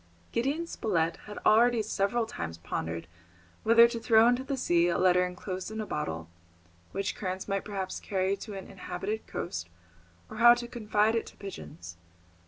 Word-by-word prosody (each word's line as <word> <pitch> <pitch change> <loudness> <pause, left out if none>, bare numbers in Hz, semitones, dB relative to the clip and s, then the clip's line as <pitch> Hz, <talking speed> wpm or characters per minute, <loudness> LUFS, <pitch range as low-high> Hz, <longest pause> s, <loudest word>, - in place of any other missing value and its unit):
Gideon 280 +8 0
Spilett 170 - -1
had 210 - -8
already 235 +1 +5
several 215 +2 0
times 85 - -6
pondered 85 0 -4 0.6
whether 230 +1 +7
to 235 0 -4
throw 225 0 +5
into 245 +2 +2
the 270 0 -3
sea 175 -8 +3
a 175 - +1
letter 180 0 +4
enclosed 185 +1 -4
in 220 0 -6
a 215 - -2
bottle, 80 - -3 0.6
which 195 0 -2
currents 185 -1 -4
might 195 -1 -1
perhaps 195 -3 -4
carry 190 0 0
to 210 -1 -8
an 195 - -7
inhabited 195 +3 -5
coast, 85 - -4 0.6
or 235 +2 +6
to 240 0 -5
confide 220 -2 +1
it 230 - -1
to - - -13
pigeons. 160 - -9
200 Hz, 165 wpm, -29 LUFS, 180-230 Hz, 0.6 s, whether